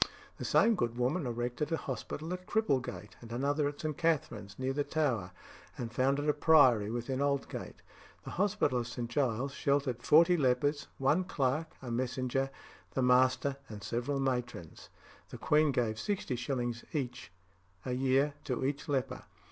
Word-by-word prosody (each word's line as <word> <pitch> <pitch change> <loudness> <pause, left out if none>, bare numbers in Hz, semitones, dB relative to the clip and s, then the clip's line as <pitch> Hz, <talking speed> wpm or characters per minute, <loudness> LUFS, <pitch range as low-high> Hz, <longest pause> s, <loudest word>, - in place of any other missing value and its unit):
The - - -4
same 230 - +4
good 120 - -1
woman 130 +5 0
erected 120 +6 -2
a 165 - +2
hospital 155 +5 -5
at 180 0 -7
Cripplegate, 130 - -1
and 115 -1 -11
another 145 +4 +1
at 145 0 -5
St. 155 -1 -2
Katharine's, 125 - -1
near 130 +1 -1
the 145 +1 0
Tower, 130 - 0 0.5
and 120 -1 -5
founded 135 +4 +1
a 150 - +4
priory 135 -9 +5
within 120 +3 -2
Aldgate. 140 -1 -2 0.4
The - - -7
hospital 190 -9 +1
of 120 - -3
St. 120 -1 -4
Giles 130 +1 0
sheltered 140 -4 0
forty 170 +6 +6
lepers, 145 +1 +1
one 145 +7 +2
clerk, 155 -1 -1
a 120 - -5
messenger, 130 +2 -1 0.5
the 130 - +1
master, 130 +2 +3
and 105 -2 -8
several 125 +4 -2
matrons; 125 - -3 0.4
the - - -8
queen 150 0 +3
gave 115 -4 0
60s. 125 - -2 1.0
a 125 - -2
year 135 +3 +2
to 130 0 -1
each 145 +3 -3
leper. 135 -3 -2
135 Hz, 150 wpm, -32 LUFS, 120-145 Hz, 1.0 s, forty